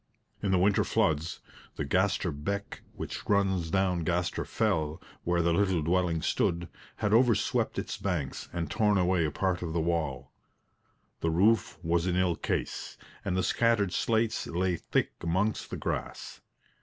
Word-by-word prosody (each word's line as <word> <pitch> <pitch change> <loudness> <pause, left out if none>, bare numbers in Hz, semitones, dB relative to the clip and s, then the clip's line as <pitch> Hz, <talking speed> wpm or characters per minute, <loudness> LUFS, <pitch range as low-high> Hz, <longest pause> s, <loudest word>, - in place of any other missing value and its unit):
In 100 - -1
the 95 - +4
winter 100 +3 +3
floods, 80 -8 0 0.3
the 75 - -3
Gaster 95 +2 +1
Beck, 100 +8 -4
which - - -5
runs 95 -4 +2
down 95 0 +1
Gaster 90 +1 -1
Fell, 80 0 0 0.3
where 85 0 +2
the 85 0 +2
little 95 -3 +2
dwelling 85 -1 +1
stood, 85 -3 0 0.3
had 105 -1 0
overswept 115 -1 +3
its - - -3
banks 85 -9 -3
and 85 -2 -2
torn 105 -2 +3
away 90 -2 +2
a - - 0
part 95 +2 -1
of 85 -2 -3
the 85 - +1
wall. 80 -6 -1 0.9
The 85 - 0
roof 95 +5 +3
was 85 +1 +1
in 90 - +1
ill 90 -2 +2
case, - - -3 0.3
and 95 -1 -1
the 95 - +1
scattered 115 -5 +2
slates 110 -1 +1
lay 90 +1 0
thick - - -1
amongst 95 +6 0
the - - -4
grass. - - -4
90 Hz, 155 wpm, -29 LUFS, 85-100 Hz, 0.9 s, the